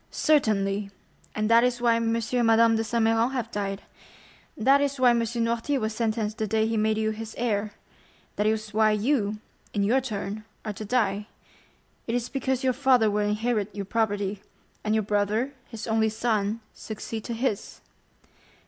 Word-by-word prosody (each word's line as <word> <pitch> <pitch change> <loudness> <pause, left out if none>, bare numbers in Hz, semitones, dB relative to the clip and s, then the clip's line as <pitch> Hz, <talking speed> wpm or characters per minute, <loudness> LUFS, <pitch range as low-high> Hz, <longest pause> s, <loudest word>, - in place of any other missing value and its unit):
"Certainly; 205 -9 +1 0.5
and 215 0 0
that 230 +1 +6
is 250 -1 +1
why 240 -1 +3
M. 230 0 0
and 230 +1 0
Madame 225 0 +5
de 225 - 0
Saint 230 0 0
Méran 225 +3 +2
have 235 -3 -3
died; 195 -1 -3 0.7
that 270 +5 +4
is 280 -1 -1
why 250 -1 +6
M. 235 - +2
Noirtier 235 +4 0
was 220 -1 -2
sentenced 220 -1 -1
the 220 - 0
day 220 +1 +1
he 225 0 -1
made 215 0 +1
you 220 0 0
his 220 0 -7
heir; 215 -3 -1 0.6
that 210 - +1
is 215 -1 -1
why 215 0 +4
you, 215 -1 +1 0.4
in 200 - +2
your 245 +6 +3
turn, 210 -3 -4 0.2
are 210 - -3
to 210 - -7
die—it 210 +1 -4
is 245 -1 -2
because 265 -1 -1
your 260 -1 +2
father 250 -4 +3
would 210 0 +1
inherit 210 -1 -1
your 200 -1 -4
property, 205 -2 -1 0.4
and 215 0 +1
your 220 - +2
brother, 210 +6 0
his 225 -2 -7
only 220 -1 +2
son, 220 -1 -1
succeed 220 0 -6
to 235 - -3
his." 225 -3 -3
220 Hz, 175 wpm, -26 LUFS, 210-235 Hz, 0.7 s, that